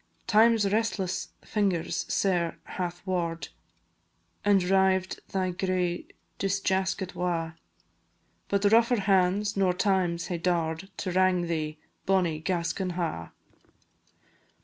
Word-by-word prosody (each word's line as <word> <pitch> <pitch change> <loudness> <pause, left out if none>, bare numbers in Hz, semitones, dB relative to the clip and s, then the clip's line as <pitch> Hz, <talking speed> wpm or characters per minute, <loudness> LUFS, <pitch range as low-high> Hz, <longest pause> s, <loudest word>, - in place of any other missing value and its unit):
Time's 225 -1 +4
restless 200 -4 -1
fingers 195 -6 -1
sair 175 -4 +1
hath 175 0 -5
waur'd 170 -3 -2 0.9
And 200 -2 +4
rived 190 0 +2
thy 185 -1 0
gray 180 -1 -1 0.3
disjaskit 190 -1 0
wa', 170 -2 -1 1.0
But 200 0 +2
rougher 230 0 +4
hands 195 +1 +2
nor 190 -2 +2
Time's 180 -3 +1
hae 175 -2 -3
daur'd 170 +1 -1
To 185 - -3
wrang 185 -1 +3
thee, 155 -2 -2 0.3
bonnie 180 -5 +2
Gascon 175 +2 -2
Ha'! 160 - -3
185 Hz, 105 wpm, -28 LUFS, 175-195 Hz, 1.0 s, Time's